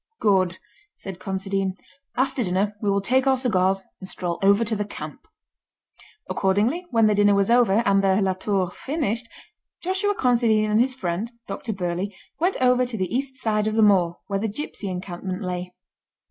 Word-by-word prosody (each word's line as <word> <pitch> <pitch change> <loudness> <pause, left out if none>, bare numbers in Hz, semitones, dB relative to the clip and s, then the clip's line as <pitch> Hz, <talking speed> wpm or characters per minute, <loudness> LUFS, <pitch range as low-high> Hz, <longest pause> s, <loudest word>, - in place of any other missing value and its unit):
"Good!" 185 -3 +2 0.4
said 190 -2 -8
Considine. 195 0 -2 0.4
"After 260 0 +1
dinner 195 +2 0
we 205 - 0
will 200 0 +2
take 260 +6 +2
our 265 -1 +4
cigars 195 -6 +1 0.2
and 190 - -8
stroll 175 -1 -3
over 200 +3 +4
to 220 0 -1
the 210 - -1
camp." 205 - -9 1.0
Accordingly, 220 - +1
when 230 -3 +3
the 215 - +4
dinner 205 0 +4
was 200 +2 +2
over, 235 -2 +4
and 195 0 +3
the 195 0 +3
La 190 -2 +2
Tour 185 -1 -1
finished, 240 - -2 0.5
Joshua 385 +3 0
Considine 230 - +2
and 215 - +4
his 260 +1 +1
friend, 195 0 -3
Dr 225 - -5
Burleigh, 180 +1 -2 0.3
went 360 +4 +1
over 250 0 +4
to 245 -2 -3
the 190 +3 -2
east 265 0 -2
side 215 -4 0
of 215 - -1
the 220 - +4
moor, 180 -5 +4
where 200 -1 -2
the 220 - -1
gipsy 215 -3 -5
encampment 185 +1 -5
lay. 180 0 -4
205 Hz, 175 wpm, -24 LUFS, 190-240 Hz, 1.0 s, our